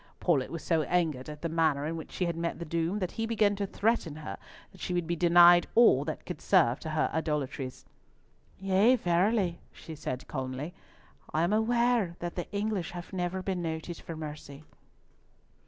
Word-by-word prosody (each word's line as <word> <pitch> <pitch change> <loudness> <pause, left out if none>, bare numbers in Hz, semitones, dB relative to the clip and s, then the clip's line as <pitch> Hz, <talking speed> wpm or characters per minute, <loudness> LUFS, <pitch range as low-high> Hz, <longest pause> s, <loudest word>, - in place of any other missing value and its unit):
Paulett 145 -8 +1
was 165 - -6
so 165 -2 +2
angered 155 -5 0
at 150 +1 -9
the - - +1
manner 160 -3 +1
in 160 +2 -2
which 160 - -8
she 180 - -1
had 170 -1 -2
met 170 0 -2
the 170 - -6
doom, 170 +4 -1
that 185 -4 -2
he 225 0 -3
began 215 -3 +2
to 200 0 -2
threaten 200 -7 0
her 155 0 -7 0.3
that 190 - -16
she 180 - -2
would 175 -1 0
be 170 +1 -1
denied 175 0 +6
all 220 - +6
that 155 - -5
could 180 - -6
serve 155 -11 +3
to 160 - -6
her 155 0 0
idolatries. 150 -4 -3 0.7
"Yea, 195 +6 +4
verily," 180 -2 +1
said 150 -5 -6
she - - -22
calmly, 130 +4 -5 0.6
"I 160 - +3
am 175 +4 +1
aware 235 -4 +2
that 175 0 -5
the 175 - -5
English 205 -3 -2
have 175 +2 -8
never 185 0 -2
been 185 -2 -2
noted 165 +1 -4
for 165 - -8
mercy." 150 -2 -8
170 Hz, 190 wpm, -29 LUFS, 155-190 Hz, 0.7 s, denied